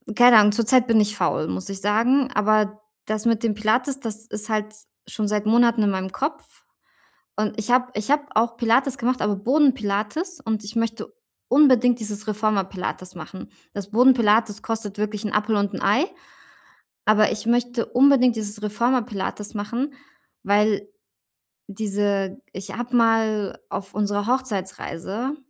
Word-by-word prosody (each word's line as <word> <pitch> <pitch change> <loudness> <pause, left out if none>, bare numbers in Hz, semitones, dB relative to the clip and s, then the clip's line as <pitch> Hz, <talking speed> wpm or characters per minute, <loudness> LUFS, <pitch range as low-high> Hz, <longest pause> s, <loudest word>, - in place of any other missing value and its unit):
keine 245 -1 +7
Ahnung, 210 0 +6
zurzeit 240 +3 +3
bin 225 -1 +4
ich 210 0 0
faul, - - 0
muss 95 0 -4
ich 195 0 -6
sagen, 250 +6 +2
aber 215 0 +1 0.2
das 215 0 -3
mit 230 -1 +1
dem 225 -2 +1
Pilates, 235 +6 0
das 225 -3 -6
ist 215 -1 -5
halt 215 -1 -1
s 215 0 -18 0.2
schon 215 -2 -3
seit 210 0 -1
Monaten 235 0 +3
in 205 - +2
meinem 190 0 -3
Kopf, 300 - -5 0.7
und 215 0 -2
ich 220 +3 -3
habe 250 0 +3
ich 210 +5 -2
habe 295 0 +3
auch 230 +1 +1
Pilates 250 +3 +2
gemacht, 250 0 -1
aber 210 -1 0
Boden-Pilates, 260 - 0
und 220 -1 -2
ich 215 +3 -8
möchte 230 0 -3 0.4
unbedingt 250 -3 +5
dieses 210 0 -5
Reformer-Pilates 195 -3 -2
machen. 175 +3 -10 0.2
Das 200 0 -7
Boden-Pilates 225 -3 +3
kostet 220 -3 -4
wirklich 210 0 -3
'n 210 - -3
Appel 210 +1 +1
und 200 -1 0
'n - - -5
Ei, 210 - +3 1.0
aber 215 0 +4
ich 210 +1 -5
möchte 240 0 0
unbedingt 255 -2 +4
dieses 210 0 -5
Reformer-Pilates 215 -1 -2
machen, 240 +7 -3 0.5
weil 205 +1 +1 0.8
diese 200 0 -2
ich 195 +1 -7
habe 245 +1 -3
mal 225 -3 +1
auf 195 0 -6
unserer 205 0 -1
Hochzeitsreise, 215 - -3
215 Hz, 155 wpm, -23 LUFS, 205-245 Hz, 1.0 s, keine